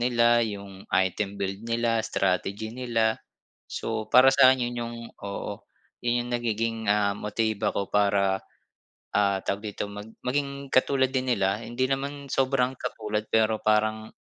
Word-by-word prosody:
nila, 120 -1 +4
'yung 100 -2 -8
item 95 +2 +1
build 95 +1 -2
nila, 115 0 +1
strategy 100 +3 -1
nila. 115 -3 0 0.5
So, 110 -1 -3
para 130 +1 +8
sa'kin 130 -1 +6
'yun - - -7
'yung 115 0 -6 0.3
oo 100 0 -5 0.4
'yun 120 0 0
'yung 120 - -7
nagiging, 115 -1 -1
ah, 105 -1 +2
motibo 110 0 -1
ko 100 - -2
para, 100 -1 +2 0.8
ah, 100 -1 +3
tawag 100 +1 -2
dito - - -3
mag 105 +1 -8 0.2
maging 140 +1 -2
katulad 130 0 +3
din 130 -1 0
nila 100 0 +1
hindi 120 +3 -1
naman 140 +1 -3
sobrang 130 -1 +2
katulad 105 -1 -3
pero 110 -1 +3
parang 110 0 +1
110 Hz, 145 wpm, -26 LUFS, 105-125 Hz, 0.8 s, para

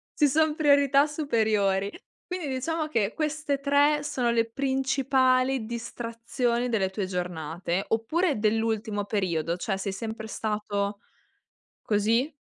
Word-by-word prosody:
Ci 295 - +4
son 310 +2 +2
priorità 285 -2 +4
superiori. 215 -9 +1 0.4
Quindi 360 -4 -4
diciamo 305 +4 -2
che 225 -7 0
queste 305 -2 -1
3 285 +1 +3
sono 250 -4 -1
le 230 -1 +2
principali 265 -1 +1
distrazioni 235 +1 -2
delle 205 -5 +1
tue 195 0 -2
giornate 175 0 -3
oppure 285 +7 +1
dell'ultimo 220 -1 0
periodo? 170 -5 -1
Cioè, 195 +2 -2
sei 195 +1 -3
sempre 220 +2 -5
stato 210 -2 -2 0.8
così? 225 +7 +1
230 Hz, 115 wpm, -27 LUFS, 205-280 Hz, 0.8 s, Ci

